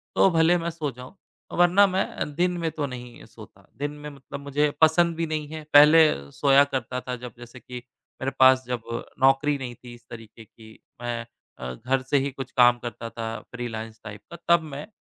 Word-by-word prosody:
तो 195 - +5
भले 165 +2 +4
मैं 170 0 -3
सो 155 -4 -4
जाऊँ। 125 - -12 0.4
वरना 180 +3 +5
मैं 190 +1 0
अ, - - -5
दिन 175 +4 -1
में 165 -1 -1
तो 150 -2 -3
नहीं 125 -2 -9
सोता, - - -16
दिन 145 +1 -3
में 150 0 -9
मतलब 140 0 -10
मुझे 145 +1 0
पसंद 165 +1 +4
भी 165 0 -2
नहीं 155 -1 -3
है। 155 -1 -7
पहले 150 - +6
सोया 140 0 +4
करता 125 0 -3
था 125 -1 -5
जब 125 -1 -9
जैसे 120 +1 -12
कि 125 +1 -9 0.4
मेरे 135 +1 -1
पास 130 0 +6
जब 125 -2 -3 0.4
नौकरी 135 +2 +3
नहीं 125 -3 -7
थी 120 0 -13
इस 120 - -21
तरीके 115 -1 -12
की 110 0 -17 0.2
मैं 120 -1 -4 0.3
अ, 65 0 -5
घर 130 - -1
से 135 +2 0
ही 140 +1 -1
कुछ 135 -1 -8
काम 120 -1 +6
करता 115 -1 -7
था 115 -1 -5
फ़्रीलांस 115 -2 -6
टाइप 105 -1 -9
का, 170 - -8 0.2
तब 170 - -1
मैं 145 +1 -8
135 Hz, 205 wpm, -25 LUFS, 120-150 Hz, 0.4 s, पहले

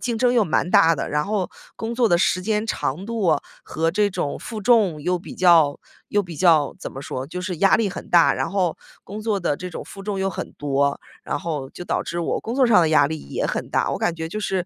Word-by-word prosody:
竞 240 -2 -2
争 245 +1 +3
又 235 -3 +3
蛮 175 +1 0
大 165 0 +5
的， 140 - -4
然 150 0 0
后 200 -3 -1 0.3
工 225 +1 -4
作 235 -1 +3
的 175 - +4
时 185 0 +2
间 215 +1 -1
长 180 -4 -2
度 205 -9 +1 0.3
和 165 +1 -1
这 205 +3 +1
种 145 -6 -3
负 220 -3 -6
重 205 -9 +3
又 180 +3 0
比 175 - -10
较 165 -5 +4 0.3
又 205 - +1
比 175 -4 -9
较 160 -4 +3
怎 - - -7
么 135 - -8
说， 130 -1 -5
就 180 +4 -6
是 180 -2 -4
压 195 +4 +4
力 220 -2 0
很 - - -8
大。 170 -2 +6
然 - - -2
后 185 -4 0 0.3
工 210 +3 -8
作 210 -3 -1
的 145 -4 0
这 180 - -6
种 - - -6
负 195 - -10
重 195 -1 -3
又 195 - 0
很 - - -6
多， 140 0 0 0.2
然 - - -3
后 150 -5 -4
就 - - -9
导 - - -1
致 170 0 -4
我 165 - -1
工 230 - -5
作 260 -2 +4
上 215 -5 +6
的 160 -2 +2
压 145 -2 +5
力 160 +1 -4
也 - - -3
很 - - -3
大， - - +1
我 - - -2
感 175 - 0
觉 160 -1 -5
就 210 +6 -5
是， 190 -4 -1
180 Hz, 275 characters per minute, -22 LUFS, 160-210 Hz, 0.3 s, 大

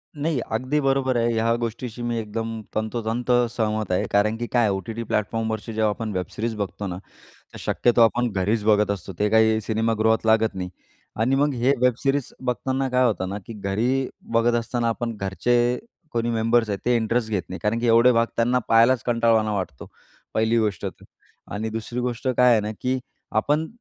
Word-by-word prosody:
नाही, 150 -1 -1
अगदी 130 +7 0
बरोबर 135 -1 +1
आहे. 115 0 +2
ह्या 115 +1 +2
गोष्टीशी 120 +1 -5
मी 120 -1 -1
एकदम 115 +1 -4
तंतोतंत 115 +3 -2 0.2
सहमत 110 -3 -2
आहे. 90 - +1
कारण 105 +2 +2
की 120 - -4
काय 120 - +3
आहे, - - +2
ओ-टी-टी 110 +4 -5
प्लॅटफॉर्मवरची 110 +1 -2
जेव्हा 110 0 +2
आपण 110 +1 -3
वेबसिरीज 105 +5 -3
बघतो 100 0 -4
ना, 90 - -4 0.6
तर - - -10
शक्यतो 120 -1 +1
आपण 120 +1 +3
घरीच 100 +3 0
बघत 105 -1 +3
असतो. 95 -1 -4
ते 105 - +2
काही 110 0 +4
सिनेमागृहात 110 +1 +1
लागत 110 -1 +3
नाही. 90 -1 -4 0.5
आणि 115 +5 +2
मग 145 +2 +2
हे 125 +3 +2
वेबसिरीज 130 +2 +1
बघताना 130 +2 -1
काय 130 0 +2
होतं 95 -5 -1
ना. 100 +2 -4
की 115 - -7
घरी 120 +7 0 0.2
बघत 115 +1 +3
असताना 120 0 -1
आपण 115 0 -2
घरचे 120 +5 +1 0.3
कोणी 120 0 0
मेंबर्स 115 0 +2
आहेत 100 - -2
ते 125 - +3
इंटरेस्ट 115 0 0
घेत 100 -4 0
नाही 95 - -6
कारण 105 +2 +1
की 120 - -1
एवढे 115 +2 +6
भाग 115 0 +3
त्यांना 120 +2 +2
पाहायलाच 115 +2 +5
कंटाळवाना 115 -2 +2
वाटतो 90 -9 -5 0.5
पहिली 110 +1 +2
गोष्ट 105 -6 -1
तर. - - -8 0.5
आणि 110 +2 -3
दुसरी 115 +2 -4
गोष्ट 125 +1 -2
काय 125 0 +6
आहे 110 - +4
ना, 105 +1 -3
की 130 +1 0 0.3
आपण 150 +2 +1
115 Hz, 185 wpm, -24 LUFS, 110-120 Hz, 0.6 s, एवढे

